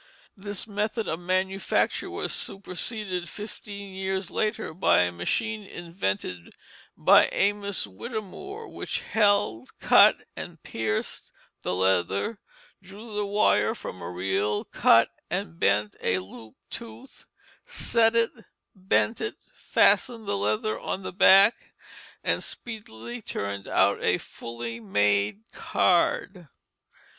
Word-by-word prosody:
This 205 0 -5
method 215 +1 -2
of 160 - -2
manufacture 185 +2 0
was - - -3
superseded 190 -1 -3
fifteen 205 -2 -8
years 190 -1 -3
later 215 -4 -1
by 160 - +4
a 90 0 +1
machine 215 - -2
invented 135 - -4 0.4
by - - +6
Amos 200 - +1
Whittemore, 230 - -7
which - - -4
held, 200 - +1
cut, - - +6
and - - -8
pierced 110 -1 -3 0.3
the - - -2
leather, 95 - +1 0.4
drew 205 +4 -11
the 210 -1 -1
wire 200 - +3
from 90 - -8
a 85 - -5
reel, 95 +3 -1
cut - - +4 0.2
and 80 +1 -3
bent 105 +1 +2
a 90 - +1
looped 100 +4 -11
tooth, 235 +3 -9 0.4
set 230 - +3
it, 230 0 +3 0.4
bent 195 +4 +1
it, 430 - -3 0.2
fastened 230 -3 +3
the 200 - 0
leather 215 +2 -1
on 190 - -4
the - - -6
back, 195 +3 +5 0.5
and - - 0
speedily 120 - -6
turned 100 -2 -4
out - - +2
a - - +3
fully 115 0 -7
made 105 - +1
card. 180 0 +1
190 Hz, 115 wpm, -26 LUFS, -, 0.5 s, by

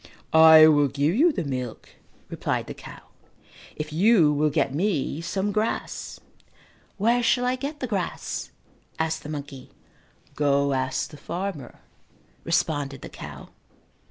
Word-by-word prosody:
"I 160 0 +9
will 145 -2 +5
give 140 +4 0
you 320 - +4
the 285 - -3
milk," 130 -5 -5 0.4
replied - - -2
the - - -7
cow, - - -12 0.7
"if 150 0 -6
you 175 -3 +4
will 150 +1 +2
get 135 -1 0
me 160 -3 -1
some 195 +4 -2
grass." 215 +2 -3 0.8
"Where 235 +4 +2
shall 245 +1 +2
I 250 +1 +1
get 280 +3 -6
the - - -1
grass?" 200 -7 -4 0.5
asked 160 0 -1
the 150 - -9
monkey. 140 -3 -7 0.6
"Go 140 -1 +1
ask 130 0 -2
the 150 - -11
farmer," 165 -4 -6 0.6
responded 145 -5 -1
the - - -7
cow. - - -10
155 Hz, 135 wpm, -25 LUFS, 140-200 Hz, 0.8 s, I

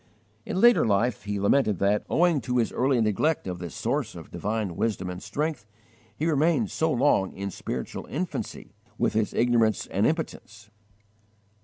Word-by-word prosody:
In 200 -4 -2
later 240 +2 +6
life 105 0 +1
he 105 0 -2
lamented 105 0 +2
that, 100 +3 +1
owing 170 -4 +3
to 125 0 -1
his 115 - +1
early 130 0 +1
neglect 110 +9 +1
of 90 -2 -4
this 85 -2 -7
source - - -2
of - - -10
divine 105 -4 -2
wisdom 95 -4 -1
and 90 +1 -7
strength, 150 -8 -3 0.5
he 155 - -1
remained 165 +7 +2
so 160 0 0
long 125 -8 +2
in 100 0 -4
spiritual 65 -6 -5
infancy, 175 +5 -5 0.2
with - - 0
its 110 -1 +1
ignorance 115 -3 +2
and 100 +3 +1
impotence. 110 -10 -4
115 Hz, 160 wpm, -26 LUFS, 100-150 Hz, 0.5 s, later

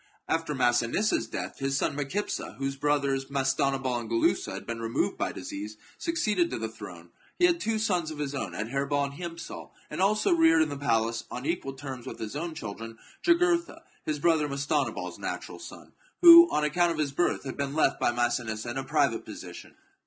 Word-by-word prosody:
After 165 -2 -1
Massinissa's 120 - +2
death, 95 -4 -5
his 135 0 0
son - - 0
Micipsa, 145 +9 -3
whose 135 0 -2
brothers, 140 -1 0
Mastanabal 135 -2 0
and 115 -2 -7
Gulussa, 115 -11 +1
had - - -7
been 115 -1 -4
removed 115 0 0
by - - -2
disease, 105 +2 -7 0.2
succeeded 215 - +1
to - - -3
the 110 - -3
throne. 90 -6 -11 0.3
He 355 - +5
had 345 -1 +3
two 225 -5 0
sons 180 -7 0
of 155 - -7
his 145 -1 -3
own, 105 -11 -4
Adherbal 140 +7 -1
and 140 0 -3
Hiempsal, 170 +2 -7 0.2
and - - -3
also 210 +2 +3
reared 165 -1 +5
in 155 - -3
the 145 - -4
palace, 115 -3 0
on 125 +2 -6
equal 155 -4 -2
terms 130 -2 -8
with - - -6
his 110 +3 -6
own 165 +2 -4
children, 115 0 -7 0.2
Jugurtha, 340 -1 +2 0.2
his 155 -1 -2
brother 155 0 +2
Mastanabal's 140 0 -2
natural - - -5
son, - - -11 0.3
who, 340 0 +11
on 150 - 0
account 170 +3 +2
of 165 - -3
his 150 -3 0
birth, 175 +6 0
had 135 - -5
been 140 0 -3
left 155 -3 +2
by - - +2
Massinissa 120 -2 -1
in 125 - -5
a - - -3
private 140 -5 +1
position. 90 -5 -10
140 Hz, 190 wpm, -28 LUFS, 120-165 Hz, 0.3 s, who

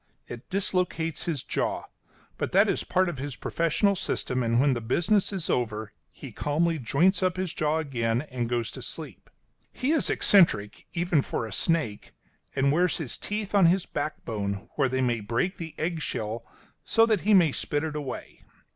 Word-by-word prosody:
It 120 -1 -9
dislocates 180 -4 -1
his 155 -7 -2
jaw, - - -1 0.6
but - - -2
that - - +6
is - - 0
a - - -9
part 185 0 +2
of 170 -7 -4
his 140 -2 -4
professional 170 +5 +1
system, 130 -7 -2
and 115 0 +2
when 140 0 +4
the 120 - -3
business 175 - +2
is 190 -5 -3
over 110 -3 -1 0.2
he - - -10
calmly 160 +2 0
joints 170 - +2
up 185 -1 +1
his 185 -3 -2
jaw 155 +1 0
again 120 -6 -1
and 125 -5 -4
goes 120 -2 -1
to - - -9
sleep. - - -6 0.4
He 260 +4 -1
is 320 -3 +3
eccentric, 110 - +3
even 175 -3 +2
for 115 - -3
a 110 - -7
snake, 160 - -1 0.4
and 140 0 +3
wears 175 +3 +2
his 145 -8 -3
teeth 210 -1 -4
on 195 -4 +6
his 180 +2 +2
backbone, 110 -8 -4
where 135 -3 +1
they 130 +1 0
may 120 -2 +1
break 115 - -1
the 165 -2 -7
egg 160 0 -2
shell 110 -3 -4 0.4
so 225 0 +4
that 220 -2 +1
he 215 0 +4
may 170 -5 +5
spit 145 +2 -1
it 155 -2 -3
away. 145 -3 -6
150 Hz, 185 wpm, -27 LUFS, 120-180 Hz, 0.6 s, that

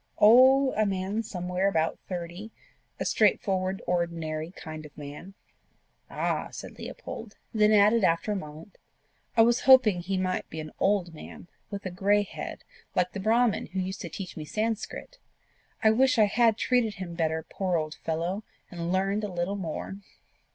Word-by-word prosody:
"Oh, 260 +5 +7
a 215 - +2
man 195 +2 -1
somewhere 180 -2 -2
about 165 -4 0
thirty 180 +3 -5 0.5
a - - -2
straightforward, 190 -3 +1
ordinary 165 -2 -2
kind 155 -3 -9
of 150 - -14
man." 150 +6 -9 0.7
"Ah!" - - -1
said - - -9
Leopold 220 -2 -8 0.2
then 215 -1 +4
added 210 +1 +5
after 170 +4 +2
a - - 0
moment 155 +1 -9 0.6
"I 225 - +8
was 240 +1 +3
hoping 230 -8 +7
he 190 +2 -2
might 185 0 -2
be 160 - -6
an 155 -1 -6
old 195 -4 +1
man, 160 +2 -11 0.2
with 200 -1 -6
a 185 - -3
grey 200 +3 +2
head, 200 - -7 0.3
like 180 0 +1
the 200 - -5
brahmin 225 +3 +2
who 190 +4 -4
used 185 +1 -3
to 170 - -5
teach 185 +2 -7
me 155 - -6
Sanscrit. 225 - -4 0.6
I 220 - +6
wish 260 +3 +3
I 215 - +6
had 225 +1 +3
treated 240 -4 +1
him 185 -4 -6
better, 160 -1 -1
poor 185 -3 -1
old 155 -1 -3
fellow! 170 +6 -2 0.3
and 170 -1 -4
learned 195 +3 0
a 205 - -3
little 175 +3 -2
more." 190 +1 -5
190 Hz, 165 wpm, -28 LUFS, 170-215 Hz, 0.7 s, I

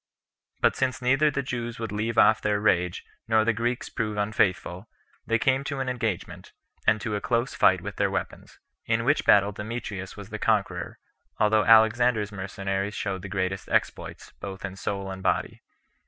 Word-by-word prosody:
But - - +3
since 130 -1 -1
neither 135 +4 +3
the 140 -1 -2
Jews 120 -2 -4
would 115 -3 -5
leave 110 +2 -2
off 110 - +5
their 105 -1 +1
rage, 90 -4 +1 0.2
nor 110 -1 +3
the 115 - +3
Greeks 120 +2 -2
prove 105 -2 -3
unfaithful, 100 -1 0 0.4
they 115 - +3
came 130 +3 +1
to 140 -1 -3
an 130 -1 -1
engagement, 115 -7 -4 0.3
and 105 0 +4
to 105 -1 -2
a 105 - -3
close 120 +1 0
fight 90 -1 +4
with 100 +1 -7
their - - +2
weapons. - - -5 0.3
In 115 0 +1
which 145 +3 +2
battle 100 0 +5
Demetrius 105 -2 -6
was 100 0 -9
the 110 - -5
conqueror, 100 -6 0 0.4
although 105 0 +3
Alexander's 110 -1 +4
mercenaries 95 +1 -3
showed 95 -3 -3
the 100 - -7
greatest 95 0 -2
exploits, - - -2
both 95 -1 -6
in 95 -1 -6
soul 95 +1 -4
and 95 0 -7
body. - - -1
105 Hz, 175 wpm, -26 LUFS, 100-115 Hz, 0.4 s, off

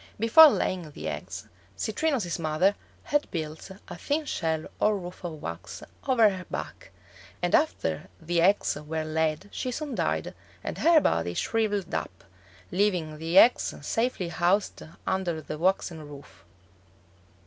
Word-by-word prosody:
Before 230 +9 +9
laying 180 - -1
the 80 - -7
eggs, 75 -1 -6 0.3
Citrinus's 220 - -1
mother 160 +5 +2 0.3
had 295 0 0
built 155 0 -5 0.2
a 175 - -7
thin 295 - -1
shell 160 - -1
or 210 -1 +3
roof 180 -1 -9
of 165 -3 -5
wax 85 0 -7 0.2
over 240 -5 +5
her 185 -2 -6
back, - - -7 0.5
and - - -1
after 80 +3 +1
the 170 +1 0
eggs 195 +4 +3
were 155 +2 -4
laid 155 +3 -1
she 255 - -3
soon 285 +3 -4
died - - -1 0.3
and - - -5
her 330 -1 +6
body 85 - 0
shriveled 210 -4 -1
up, 90 - -4 0.5
leaving 180 -6 0
the 165 +3 0
eggs 240 +5 +6
safely 225 - -1
housed 180 +4 +1 0.2
under 185 -4 -1
the 155 0 -7
waxen 175 -2 0
roof. 145 -1 -13
175 Hz, 140 wpm, -27 LUFS, 155-210 Hz, 0.5 s, Before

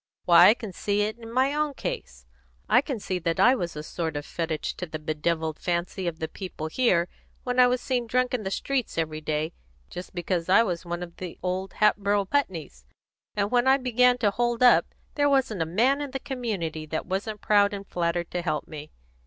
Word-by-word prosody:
Why, 175 +1 +8
I - - +8
can 215 -6 -8
see 205 +3 0
it 215 +2 -2
in 230 -1 -10
my 260 +3 +2
own 300 -1 -1
case. - - -6 0.4
I - - +5
can 275 -5 -4
see 185 -2 -3
that 165 -1 -1
I 250 - +6
was 175 -10 -3
a 150 - -5
sort 160 -1 -3
of 145 - -5
fetich 165 -2 -3
to 180 - -4
the 155 - -5
bedevilled 155 +1 -2
fancy 175 +1 -2
of 165 -2 -3
the 160 - -3
people 180 -4 -7
here 175 -1 +2 0.4
when 250 0 -1
I 250 - +8
was 250 0 0
seen 245 -3 -1
drunk 250 +2 +1
in 250 - 0
the 190 - -3
streets 260 +3 -2
every 155 -1 -2
day, 155 +2 -2 0.4
just 180 +1 -8
because 175 0 -2
I 195 +5 +6
was 175 -5 -3
one 175 +1 -4
of 170 -1 -10
the 180 -2 -7
old 185 +1 -2
Hatboro' 205 -1 +2
Putneys; 175 - -2 0.5
and 205 0 0
when 245 +1 +3
I 265 +1 +6
began 250 -1 +3
to 215 -5 +2
hold 240 +2 0
up, 245 - +6 0.3
there 290 -1 +2
wasn't 260 -9 +1
a 165 - 0
man 245 - +2
in 290 - -4
the 270 +1 -4
community 205 - -4
that 160 +1 -3
wasn't 200 +3 -3
proud 205 -1 +4
and 200 -1 -6
flattered 170 -1 -2
to 175 - -2
help 155 -3 -2
me. 155 -1 -9
190 Hz, 215 wpm, -26 LUFS, 170-245 Hz, 0.5 s, Why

